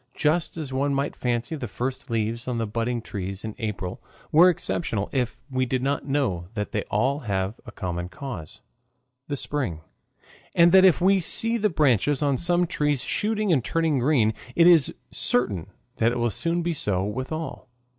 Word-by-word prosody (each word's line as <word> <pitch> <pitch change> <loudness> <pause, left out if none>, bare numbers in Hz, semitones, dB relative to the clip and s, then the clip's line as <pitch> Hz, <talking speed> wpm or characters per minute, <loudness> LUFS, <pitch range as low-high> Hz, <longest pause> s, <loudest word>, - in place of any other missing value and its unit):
Just 160 +3 0
as 145 -5 -5
one 140 +1 +1
might 140 +1 -1
fancy 120 +4 -1
the 130 -5 -5
first 130 +6 -4
leaves 115 +1 -2
on 125 -2 -1
the 115 - 0
budding 115 +2 -2
trees 95 +1 -5
in 110 - -4
April 100 -5 -4 0.3
were 170 +4 +7
exceptional 170 - -2
if 125 -3 -1
we 130 -2 -1
did 130 0 -1
not 140 +1 -1
know 130 -12 0
that 105 -1 -3
they 105 - -1
all 130 +7 0
have 100 -3 -2
a - - -7
common 90 -4 -4
cause, 90 - -7 0.7
the 145 - -2
spring, 130 - -2 0.7
and 170 0 +6
that 190 +1 +7
if 180 -2 +5
we 195 +2 +4
see 225 +6 +3
the 215 -2 +2
branches 145 - +2
on 140 -2 +2
some 175 +4 +2
trees 150 -5 0
shooting 215 -3 0
and 130 -6 +2
turning 160 -2 +1
green, 120 -5 +3 0.2
it 170 - +5
is 170 -6 +6 0.2
certain 100 -8 0 0.3
that 115 +1 +3
it 120 - -2
will 120 -1 +1
soon 170 - 0
be 170 0 0
so 100 - 0
with 125 +8 -4
all. 155 -5 -5
130 Hz, 185 wpm, -25 LUFS, 110-160 Hz, 0.7 s, were